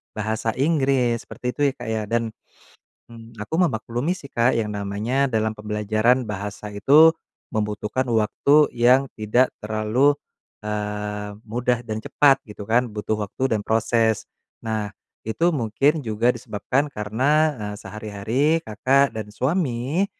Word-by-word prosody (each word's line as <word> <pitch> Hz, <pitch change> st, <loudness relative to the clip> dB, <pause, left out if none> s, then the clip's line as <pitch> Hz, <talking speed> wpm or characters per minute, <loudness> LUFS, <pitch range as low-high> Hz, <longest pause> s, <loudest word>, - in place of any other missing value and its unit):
bahasa 110 Hz, +1 st, -2 dB
Inggris 135 Hz, -5 st, +1 dB
seperti -, -, -12 dB
itu 145 Hz, -, -7 dB
ya, 135 Hz, -, 0 dB
Kak, 120 Hz, -2 st, -7 dB
ya, 110 Hz, -1 st, -1 dB
dan, 115 Hz, 0 st, -1 dB, 0.8 s
mmm, 115 Hz, -1 st, -13 dB
aku 105 Hz, -, -5 dB
memaklumi 120 Hz, +4 st, -1 dB
sih, 140 Hz, -7 st, -8 dB
Kak, 120 Hz, +1 st, +2 dB
yang 105 Hz, -, -2 dB
namanya 105 Hz, +7 st, -1 dB
dalam 110 Hz, -1 st, 0 dB
pembelajaran 110 Hz, +3 st, +1 dB
bahasa 105 Hz, +1 st, -5 dB
itu 150 Hz, +11 st, +5 dB, 0.3 s
membutuhkan 105 Hz, +3 st, -2 dB
waktu 140 Hz, +7 st, +3 dB
yang 125 Hz, +3 st, +4 dB
tidak 115 Hz, +4 st, +2 dB, 0.2 s
terlalu, 110 Hz, +6 st, +2 dB, 0.5 s
eee, 105 Hz, -1 st, -4 dB, 0.2 s
mudah 120 Hz, +1 st, 0 dB
dan 110 Hz, -3 st, -5 dB
cepat 140 Hz, -2 st, +4 dB
gitu 105 Hz, -1 st, -10 dB
kan 120 Hz, 0 st, +2 dB
butuh 105 Hz, +1 st, -2 dB
waktu 120 Hz, +3 st, -1 dB
dan 105 Hz, -, -5 dB
proses. 110 Hz, -1 st, +1 dB, 0.3 s
Nah 110 Hz, -2 st, -3 dB, 0.3 s
itu 165 Hz, +10 st, 0 dB
mungkin 140 Hz, +5 st, +1 dB
juga 115 Hz, +2 st, +1 dB
disebabkan 125 Hz, +6 st, -2 dB
karena, 110 Hz, +5 st, -1 dB, 0.3 s
eee, 105 Hz, 0 st, -4 dB
sehari-hari 105 Hz, +5 st, -3 dB, 0.2 s
Kakak 130 Hz, +6 st, +2 dB
dan 105 Hz, -1 st, -6 dB
suami, 140 Hz, -, 0 dB
115 Hz, 135 wpm, -23 LUFS, 105-130 Hz, 0.8 s, itu